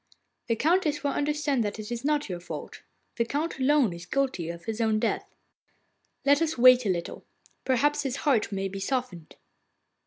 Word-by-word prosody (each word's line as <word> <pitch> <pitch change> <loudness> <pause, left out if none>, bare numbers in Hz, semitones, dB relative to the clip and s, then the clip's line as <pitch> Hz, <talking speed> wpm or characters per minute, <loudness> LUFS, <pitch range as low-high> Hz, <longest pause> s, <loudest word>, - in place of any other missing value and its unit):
'The 230 - +1
Countess 310 - +1
will 285 - +1
understand 290 -3 0
that 205 0 -3
it 215 +1 -7
is 240 +1 -4
not 295 0 +1
your 180 -3 -5
fault; 175 - -8 0.4
the 235 - +3
Count 290 +6 -3
alone 265 -6 +3
is 170 0 -10
guilty 260 -12 -1
of 170 0 -8
his 225 0 -3
own 220 -1 +2
death.' - - -2 0.9
'Let 285 +2 +4
us 325 -2 0
wait 250 -1 +7
a - - +1
little. 175 -2 -3 0.4
Perhaps 290 +3 +2
his 270 -3 -2
heart 240 -7 +2
may 195 -1 -2
be 195 +1 -6
softened. 195 - -3
255 Hz, 180 wpm, -27 LUFS, 210-290 Hz, 0.9 s, wait